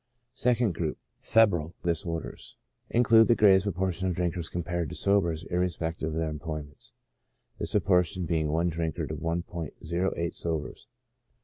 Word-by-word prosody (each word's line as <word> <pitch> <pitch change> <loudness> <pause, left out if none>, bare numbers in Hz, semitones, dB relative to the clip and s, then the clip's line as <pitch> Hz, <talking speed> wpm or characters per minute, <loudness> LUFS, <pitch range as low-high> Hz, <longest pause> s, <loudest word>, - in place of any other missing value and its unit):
Second 120 -5 +1
Group: 80 -2 -2 0.2
Febrile 85 -8 +3
Disorders 85 -1 -3 0.3
include 115 -2 +5
the 120 - +5
greatest 95 -3 +5
proportion 95 -1 -1
of 90 - -1
drinkers 85 -1 -2
compared 85 -2 -2
to - - -7
sobers 85 -5 +1
irrespective 85 -2 -1
of 80 - -3
their 80 0 0
employments, 75 -1 -7 0.7
this - - -4
proportion 90 -1 +2
being 80 -2 0
i 80 +3 +1
drinker 80 -2 -1
to - - -5
i*o8 85 +1 -3
sobers. 80 -3 -4
85 Hz, 130 wpm, -28 LUFS, 80-95 Hz, 0.7 s, include